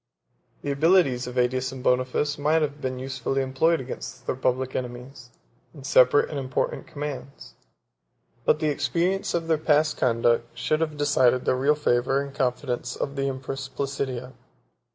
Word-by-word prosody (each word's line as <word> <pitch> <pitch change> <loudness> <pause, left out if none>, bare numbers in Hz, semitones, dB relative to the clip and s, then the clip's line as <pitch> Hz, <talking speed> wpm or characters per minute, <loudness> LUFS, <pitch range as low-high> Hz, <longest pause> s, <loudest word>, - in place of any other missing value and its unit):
The 145 - -1
abilities 140 -4 +3
of 125 - -7
Ætius 130 +1 +1
and 130 -1 -8
Boniface 130 +4 +1
might 155 +2 +2
have 145 0 -3
been 130 -1 -3
usefully 130 +1 -2
employed 160 +6 +2
against 130 -1 -7
the - - 0
public 130 0 -1
enemies, 125 0 -6 0.5
in 140 - -11
separate 130 0 +4
and 145 - -3
important 130 -1 -2
commands; 140 - -7 0.9
but 150 - +3
the 155 - +1
experience 175 +7 0
of 165 -1 -2
their 160 -2 +2
past 155 0 +2
conduct 120 -1 +1
should 155 +5 0
have 155 -2 -1
decided 130 -4 +3
the - - +3
real 135 +4 +2
favor 135 -2 +1
and 140 -1 -5
confidence 125 -1 -2
of 140 - -4
the 135 0 -1
empress 135 0 -5
Placidia. 130 -2 -4
135 Hz, 155 wpm, -25 LUFS, 125-145 Hz, 0.9 s, separate